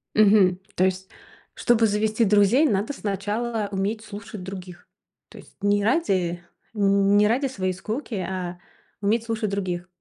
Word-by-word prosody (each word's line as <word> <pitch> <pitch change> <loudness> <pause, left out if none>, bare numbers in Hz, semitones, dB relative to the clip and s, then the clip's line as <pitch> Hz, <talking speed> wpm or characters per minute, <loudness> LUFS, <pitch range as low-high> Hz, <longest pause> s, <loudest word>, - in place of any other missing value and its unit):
Мгм. 200 -4 +5 0.2
То 185 - +2
есть, 190 0 -2 0.4
чтобы 230 -2 +3
завести 215 +2 +1
друзей, 210 +8 +4
надо 210 +4 0
сначала 210 +1 -2
уметь 205 +3 -2
слушать 205 -2 -9
других, 185 -2 -9 0.4
то - - -14
есть - - -15
не 205 0 +2
ради 190 - 0 0.3
не 200 0 +3
ради 255 +6 +1
своей 185 -7 -2
скуки, 220 +8 -5
а 180 -2 -4 0.4
уметь 220 +3 +1
слушать 220 -2 -2
других. 185 -3 -3
205 Hz, 140 wpm, -24 LUFS, 190-220 Hz, 0.4 s, Мгм